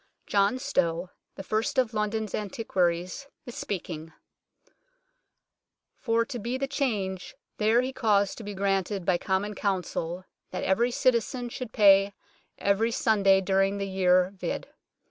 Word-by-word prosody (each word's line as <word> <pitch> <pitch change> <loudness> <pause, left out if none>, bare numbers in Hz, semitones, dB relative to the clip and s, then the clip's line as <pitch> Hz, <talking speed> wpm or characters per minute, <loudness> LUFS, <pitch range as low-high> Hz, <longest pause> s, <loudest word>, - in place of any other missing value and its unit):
John 200 +4 +2
Stow, 180 -10 -1 0.2
the 195 - -7
first 225 +8 -1
of 245 -3 +2
London 215 0 -1
antiquaries, 185 +1 -1 0.2
is 245 - -8
speaking: 165 -7 -5 1.0
" - - -56
For 230 -1 +2
to 250 -2 -6
bere 240 +4 -2
the 275 - -1
charge 210 -10 -2 0.2
there 220 +3 +4
he 260 +1 -3
caused 205 -4 +1
to - - -8
be 205 -1 -6
graunted 195 -1 -1
by 175 -1 +2
Comon 195 +2 -1
Counseill, 185 -3 -2 0.2
that - - -4
every 230 +6 +2
citezein 245 0 0
shud 250 -2 -6
pay 200 -2 +5 0.4
every 200 +3 +2
sonday 200 -4 +3
duryng 195 +1 +1
his 195 0 -3
yere 185 -1 +3
vd. 185 - -4
200 Hz, 140 wpm, -27 LUFS, 190-230 Hz, 1.0 s, pay